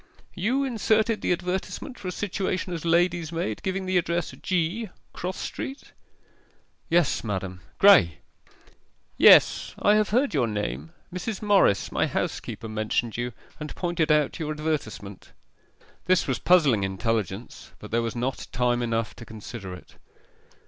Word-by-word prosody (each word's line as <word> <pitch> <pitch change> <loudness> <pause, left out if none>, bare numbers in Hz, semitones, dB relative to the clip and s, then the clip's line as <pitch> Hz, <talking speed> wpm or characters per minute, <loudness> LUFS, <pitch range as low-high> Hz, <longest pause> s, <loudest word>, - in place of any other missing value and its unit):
'You 245 +9 0
inserted 220 -3 +1
the - - 0
advertisement 180 +8 -3
for 195 - -7
a - - -1
situation 185 -1 -2
as 165 - -5
lady's 170 -1 +2
maid 165 -11 -3
giving 190 0 -2
the 185 -1 +2
address, 170 0 -2
G., 185 +5 -1 0.2
Cross 185 +1 -4
Street?' 270 +2 -6 1.0
'Yes, 165 -10 +2
madam. 95 -4 -4 0.2
Graye.' 90 - +7 1.0
'Yes. - - +6
I 205 - +4
have 215 0 +3
heard 255 +3 +2
your 130 -6 +2
name 105 +9 -4 0.2
Mrs. 190 +3 -4
Morris, 200 - +3
my - - +1
housekeeper, 115 - -3
mentioned 110 +1 -1
you, 120 +1 -2 0.3
and 150 -1 -6
pointed 170 -3 0
out 150 -2 +2
your 155 -2 -2
advertisement.' 145 -11 -4 0.7
This 185 -1 +3
was 130 - -1
puzzling 145 - +4
intelligence, 100 +2 -3
but - - -11
there 115 +1 +2
was 115 +1 -3
not 125 +2 -3
time 125 -1 +1
enough 115 -2 -1
to - - -9
consider 110 -3 -8
it. 90 - -16
160 Hz, 140 wpm, -26 LUFS, 115-185 Hz, 1.0 s, Graye